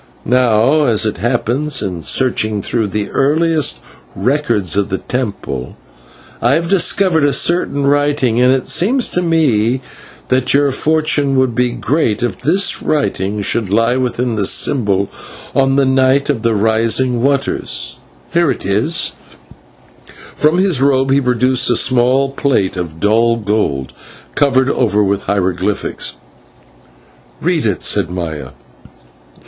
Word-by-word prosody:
Now, 125 +4 +2
as 110 -4 +2
it 110 - -2
happens, 125 - -1
in 90 -4 -4
searching 110 -3 0
through 115 -3 -1
the 105 +1 -4
earliest 155 +2 +1 0.3
records 115 - 0
of 100 -1 0
the 95 - -2
temple, 100 - -5 0.6
I 120 +3 +2
have 165 +3 0
discovered 185 -3 +2
a 145 - +3
certain 145 -4 +1
writing, 140 -4 +1
and 125 +1 +4
it 130 -1 -1
seems 245 +8 +2
to 180 - -1
me 130 -8 +1 0.5
that 130 +1 +2
your 140 0 +2
fortune 150 -1 0
would 130 -2 +1
be 125 +1 +1
great 120 -2 -1
if 120 - -3
this 185 +6 +2
writing 105 -9 -2
should 105 0 -1
lie 115 +4 +1
within 125 -1 -2
the 105 -3 0
symbol 100 -7 +1 0.5
on 135 0 +2
the 140 -1 +3
night 130 +2 +2
of 125 -6 -4
the 115 -1 0
Rising 115 +4 +1
of - - -3
Waters. 60 - -2 0.4
Here 170 -2 +2
it - - -3
is 105 - 0 0.5
" - - -30
And - - -17 0.2
from 155 +3 +2
his 185 -8 +1
robe 135 -1 +2
he 140 +1 +3
produced 125 0 +1
a 120 - +3
small 130 +3 +2
plate 135 -9 -1
of 85 -3 -6
dull 115 +4 +2
gold, 100 - -2 0.4
covered 130 -3 +2
over 105 -4 +1
with 100 0 -1
hieroglyphics. 95 0 -2 1.3
"Read - - 0
it," - - -2
said 85 - 0
Maya. 85 -4 -6
125 Hz, 145 wpm, -15 LUFS, 105-140 Hz, 1.3 s, and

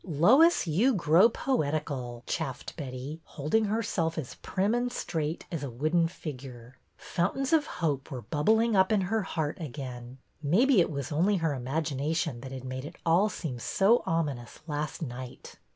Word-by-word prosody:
Lois, 220 - +5
you 210 - +3
grow 170 +4 +5
poetical," 145 - -2
chaffed 150 -7 -4
Betty, 140 +1 -6
hold 150 0 -7
ing 220 0 +5
herself 200 -6 -1
as 145 -6 -4
prim 200 +3 0
and 245 +1 0
straight 160 -6 -3
as 165 -5 -3
a 140 - -3
wooden 155 +8 +1
figure. 130 -7 -9 0.2
Fountains 260 - -1
of 310 -2 +4
hope 145 -5 -2
were 125 -3 -6
bubbling 220 +9 +2
up 190 +2 +4
in 210 -2 +3
her 215 +4 0
heart 160 -5 -3
again. 125 -4 -7 0.2
Maybe 200 - +4
it - - +1
was 140 -3 -4
only 185 +7 +2
her 165 -3 0
imag 140 +3 -2
ination 145 -2 -1
that 130 0 -8
had 130 -1 -6
made 130 0 -5
it 155 +4 -8
all 175 +6 +4
seem 155 -10 -5
so 200 - +3
ominous 145 -8 -2
last 150 0 -3
night. 125 -2 -8
160 Hz, 170 wpm, -29 LUFS, 135-190 Hz, 0.2 s, Lois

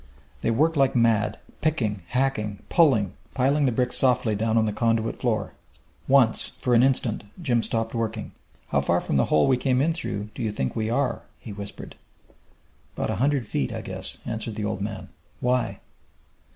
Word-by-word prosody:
They - - 0
worked 155 +8 +2
like 135 -2 +3
mad, 110 -3 +2 0.2
picking, 115 -11 0
hacking, 120 -5 -1
pulling, 130 - +4 0.2
piling 140 +3 +2
the - - +2
bricks 125 +1 0
softly 125 -4 +2
down 110 +2 +1
on 110 - +4
the 105 - -1
conduit 115 0 0
floor. - - -1 0.5
Once, 130 -5 +5
for 125 - +1
an 115 - +6
instant, 125 -5 +1 0.2
Jim 125 -9 +1
stopped 115 0 -2
working. 115 -2 -3 0.4
"How - - +2
far - - +2
from 70 - -1
the 65 - +3
hole 75 - +3
we 130 - +4
came 125 0 +1
in 160 +5 +2
through, 105 -11 -4
do - - -7
you 110 -2 0
think 65 -11 -2
we 110 -1 -1
are?" 125 0 0 0.2
he 110 - -9
whispered. 100 0 -8 1.0
"'Bout - - -1
a - - -1
hundred 135 0 +1
feet, 70 -9 -2
I - - -4
guess," - - -6
answered 115 -1 -4
the 105 -1 -3
old 105 -2 -3
man. 105 0 -5 0.3
"Why?" 125 0 0
115 Hz, 180 wpm, -25 LUFS, 105-130 Hz, 1.0 s, an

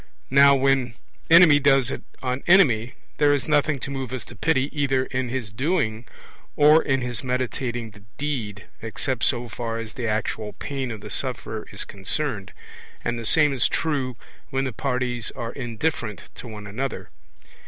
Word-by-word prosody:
Now 140 +1 +7
when 135 -3 +2 0.3
enemy 165 -3 +8
does 135 -2 +3
it - - -4 0.2
on 130 +1 -1
enemy, 130 - +5 0.2
there 145 -1 +5
is 135 - -3
nothing 150 -1 +2
to 140 - -4
move 135 -2 -4
us 130 - -4
to 120 - -12
pity 140 +3 0
either 135 -3 +1
in 130 -1 -2
his 120 -4 -4
doing 125 - -1 0.5
or 150 +2 +6
in 135 -1 0
his 125 0 -2
meditating 125 -2 -2
the 100 -1 -16 0.2
deed, 120 -9 -3 0.2
except 115 +3 -3
so 120 -2 +1
far 115 -1 -4
as 115 -1 -6
the 120 -1 -3
actual 110 0 -2
pain 135 -3 -4
of 110 -3 -6
the - - -9
sufferer 115 -4 -4
is 105 - -5
concerned; 100 0 -2 0.5
and 120 0 -1
the 115 - -6
same 150 -3 +4
is 125 -4 +2
true 135 -6 -1 0.3
when 135 -1 0
the 130 -3 -3
parties 125 -3 -1
are 115 0 -5
indifferent 120 -2 -3
to - - -10
one 105 -2 -8
another. 125 +7 -4
130 Hz, 170 wpm, -24 LUFS, 115-140 Hz, 0.5 s, enemy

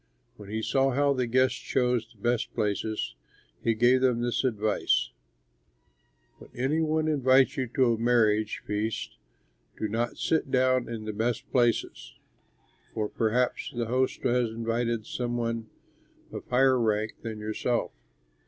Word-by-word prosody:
When 105 -2 -12
he 110 +1 -3
saw 135 +3 +2
how 140 +1 +3
the 130 -2 -1
guests 130 +2 +2
chose 125 -3 0
the - - -23
best 120 0 0
places, 105 +1 -1 0.5
he 115 - +2
gave 120 +3 +4
them 125 -3 +2
this 120 0 0
advice: 110 -4 +1 1.3
"When - - -14
any 135 +6 0
one 155 0 +1
invites 135 -3 +4
you 130 -1 -1
to 125 -3 +4
a - - -2
marriage 110 -3 +2
feast, 105 +1 -3 0.6
do 110 - -2
not 115 +3 -2
sit 160 -4 0
down 130 -1 +2
in 110 -2 -5
the 110 - -4
best 115 +2 -2
place, 120 -3 +3 1.1
for 105 -1 -1
perhaps 120 +3 0
the 120 -1 -1
host 130 +3 -1
has 125 -2 +2
invited 115 0 -2
some 120 0 -3
one 115 -1 -3 0.6
of - - -8
higher 130 0 +4
rank 110 -1 0
than 110 -2 -5
yourself. 110 +3 -2
120 Hz, 145 wpm, -27 LUFS, 110-130 Hz, 1.3 s, gave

